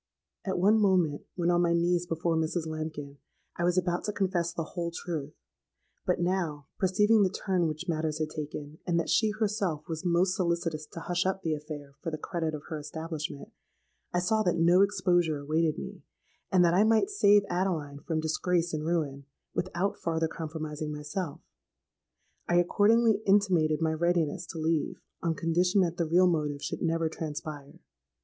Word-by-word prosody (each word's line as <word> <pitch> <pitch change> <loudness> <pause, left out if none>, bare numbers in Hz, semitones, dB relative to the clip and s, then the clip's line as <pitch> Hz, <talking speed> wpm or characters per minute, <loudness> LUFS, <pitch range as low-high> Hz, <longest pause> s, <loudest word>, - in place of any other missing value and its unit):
"At 190 -1 -1
one 205 +5 +4
moment, 180 -8 +2
when 175 -1 +1
on 175 0 +3
my 170 -1 +3
knees 175 +1 +1
before 165 0 0
Mrs. 160 +1 -1
Lambkin, 155 -3 -5 0.4
I 170 - -1
was 175 +1 +2
about 175 -1 +1
to 210 - -1
confess 180 -4 0
the 165 - -3
whole 170 -2 -2
truth: 160 -4 -5 0.7
but, - - +2
now 175 -5 -1
perceiving 210 +4 +4
the 190 - +4
turn 185 -2 0
which 155 +3 -5
matters 155 -2 -1
had 155 -1 -2
taken, 150 0 -6
and 170 -1 +2
that 170 - -1
she 220 - +4
herself 210 -7 -1
was 160 0 -4
most 180 +1 +2
solicitous 170 -4 -1
to 165 - -6
hush 175 +2 0
up 190 0 -2
the 160 - 0
affair 150 -2 -7
for - - -3
the 155 - -4
credit 160 -1 -3
of 150 - -8
her 160 -2 -3
establishment, 155 -1 -5 0.6
I - - 0
saw 200 +5 +2
that 175 -4 +1
no 170 +3 +5
exposure 180 -5 +2
awaited 155 +2 0
me, - - -7 0.5
and 180 -1 +5
that 170 - +3
I 190 +4 +5
might 225 - +3
save 205 - +5
Adeline 170 -6 -1
from 160 +1 -2
disgrace 170 +2 0
and 155 -1 -2
ruin 150 -4 -1 0.3
without 185 +2 -1
farther 165 -1 0
compromising 155 -1 -5
myself. 150 +2 -4 1.1
I 175 - +3
accordingly 215 +5 +4
intimated 180 -6 +3
my 160 -1 +2
readiness 170 0 0
to - - -7
leave 160 -1 0 0.2
on 165 -1 0
condition 180 +5 +2
that 175 -2 0
the 170 - 0
real 175 +3 +5
motive 150 -5 0
should - - -4
never 165 0 +1
transpire. 150 -2 -6
170 Hz, 175 wpm, -29 LUFS, 155-180 Hz, 1.1 s, no